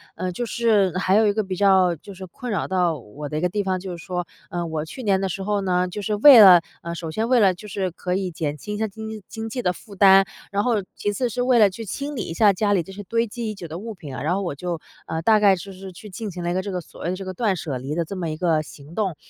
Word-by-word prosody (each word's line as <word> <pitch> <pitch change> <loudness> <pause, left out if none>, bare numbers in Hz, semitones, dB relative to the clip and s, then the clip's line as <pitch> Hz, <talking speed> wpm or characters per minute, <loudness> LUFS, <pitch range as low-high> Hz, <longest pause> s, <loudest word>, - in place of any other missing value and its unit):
呃， 185 +1 -3
就 240 +7 -3
是 210 -6 +2
还 185 0 +1
有 220 0 +5
一 205 - +2
个 215 0 0
比 190 -1 -4
较 190 -3 +4
就 200 +6 -12
是 190 +1 -8
困 245 +7 -7
扰 200 - -1
到 180 -4 +1
我 140 +4 -9
的 150 - -3
一 - - -1
个 180 - +2
地 205 +2 -1
方， 190 -1 -1
就 180 -1 -6
是 170 - -12
说， 180 -1 -3 0.2
呃， 175 -1 -3
我 160 -2 -3
去 250 +11 -8
年 195 -3 +2
的 195 - -1
时 190 +2 -4
候 205 0 0
呢， 180 -1 +1
就 205 +4 -6
是 210 +1 -1
为 250 +4 +9
了 180 -4 +9 0.2
呃， 170 0 -4
首 165 -2 -5
先 220 +6 -1
为 255 -1 +5
了 195 -4 +5
就 195 +4 -11
是 190 -2 -2
可 180 +2 -3
以 190 -2 -2
减 150 -2 -3
轻 210 +8 -6
一 - - -4
下 220 - 0
经 220 +2 -8
济 220 -1 -7
经 225 0 -6
济 250 +2 -3
的 180 - +1
负 205 +2 -13
担。 195 0 +7 0.3
然 200 0 +1
后 225 -4 +1
其 205 - -1
次 250 +5 0
是 240 +2 -3
为 250 -1 +4
了 210 -2 +7
去 210 +4 -8
清 280 +8 -4
理 225 - -2
一 165 - -5
下 205 +3 +5
家 205 +2 0
里 185 - +2
这 190 +4 -11
些 205 - -8
堆 230 +4 0
积 225 0 -4
已 215 - -7
久 175 - -8
的 160 +1 -6
物 225 +2 -6
品 150 -8 -9
啊， - - -5
然 160 +4 +1
后 195 - -1
我 170 -6 -3
就 175 +1 -4 0.3
呃， 160 - -3
大 215 +3 +5
概 200 -2 +5
就 195 +3 -9
是 190 0 -9
去 210 +4 -12
进 205 +1 -6
行 180 - -7
了 175 - -1
一 - - 0
个 185 - 0
这 200 - -5
个 180 - -2
所 - - -15
谓 - - -1
的 - - -2
这 195 - -7
个 185 - -5
断 205 -1 0
舍 145 -6 -4
离 135 +4 -5
的 170 -1 0
这 195 - -7
么 170 -3 -2
一 155 - -4
个 165 -3 +2
行 150 +2 -13
动。 195 -6 -1
190 Hz, 345 characters per minute, -23 LUFS, 175-210 Hz, 0.3 s, 为